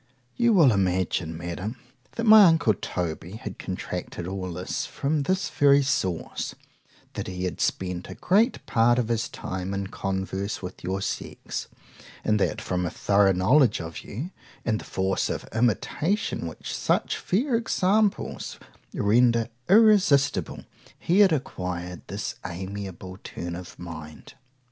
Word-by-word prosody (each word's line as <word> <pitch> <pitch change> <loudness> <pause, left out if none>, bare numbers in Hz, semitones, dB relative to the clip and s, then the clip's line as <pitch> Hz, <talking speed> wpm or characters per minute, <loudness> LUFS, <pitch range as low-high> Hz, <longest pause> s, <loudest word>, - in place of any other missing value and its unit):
You 235 -1 +3
will 160 -10 +6
imagine, 90 -4 0
Madam, 85 +7 -4 0.4
that 230 - -3
my 215 -2 +9
uncle 160 -10 +4
Toby 90 -1 -4
had 110 - -7
contracted 85 - -5
all 95 -1 -4
this 90 +2 -3
from 145 +2 -1
this 185 +5 0
very 140 0 +5
source;—that 95 -10 -4
he 90 -1 -4
had 90 -2 -3
spent 90 -1 -1
a - - -7
great 220 +7 +2
part 120 +1 +3
of 120 -2 0
his 115 -1 0
time 95 +1 -4
in 100 0 -2
converse 95 +1 -3
with 90 - -8
your 95 +2 -2
sex, - - -4 0.6
and 105 -1 +2
that 105 - 0
from 90 -4 -1
a 85 - 0
thorough 100 +3 +3
knowledge 115 +6 +4
of 80 -1 -6
you, 140 - -6 0.3
and 110 -2 +1
the - - -11
force 95 0 0
of - - -4
imitation 125 - 0
which - - -6
such - - 0
fair 245 +8 0
examples 210 -2 0 0.4
render 115 +2 +3 0.2
irresistible, 180 - +4 0.3
he 180 +4 +1
had 200 -3 +7
acquired 90 - -3
this - - -4
amiable 95 +1 -6
turn 85 0 -5
of 90 0 -9
mind. 80 -3 -9
100 Hz, 140 wpm, -26 LUFS, 90-145 Hz, 0.6 s, my